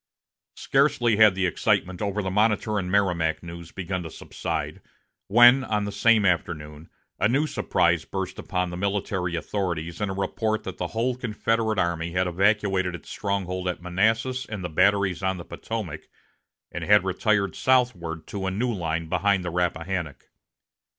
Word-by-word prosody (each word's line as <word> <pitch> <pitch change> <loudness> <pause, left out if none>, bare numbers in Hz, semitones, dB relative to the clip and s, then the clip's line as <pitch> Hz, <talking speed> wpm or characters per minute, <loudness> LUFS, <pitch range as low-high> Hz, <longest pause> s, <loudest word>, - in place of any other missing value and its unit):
Scarcely 135 -5 +2
had 105 -3 +6
the 95 0 0
excitement 90 +1 0
over 100 0 -1
the 95 - -2
Monitor 105 +1 +1
and 90 -1 -4
Merrimac 90 -6 +1
news 85 -1 -9
begun 95 -1 -4
to 80 - -7
subside, - - -5 0.5
when, 120 +5 +7
on 105 -4 -1
the 100 - -4
same 105 +1 +3
afternoon, 80 -3 -2 0.3
a 105 - +3
new 140 +5 +2
surprise - - +1
burst 95 -2 -5
upon 90 -1 -2
the 90 - -5
military 95 -2 -1
authorities 85 -1 -3
in 105 - 0
a - - -2
report 110 +3 -1
that 95 - -7
the 90 - -1
whole 120 +6 -1
Confederate 115 -2 -1
army 85 -1 -1
had 90 0 +1
evacuated 95 0 +1
its 85 - -11
stronghold 95 -2 -2
at 90 - -2
Manassas 110 +8 0
and 105 -4 -6
the 90 - -3
batteries 95 +2 +2
on 95 -1 0
the 85 - -8
Potomac, 105 -9 -6 0.6
and - - -5
had 105 -1 +5
retired 100 +1 0
southward 100 -12 +1
to 95 -2 -4
a - - +1
new 115 +6 -1
line 85 -3 -2
behind 95 +2 +1
the 90 - -3
Rappahannock. 85 -2 -3
95 Hz, 165 wpm, -25 LUFS, 90-105 Hz, 0.6 s, when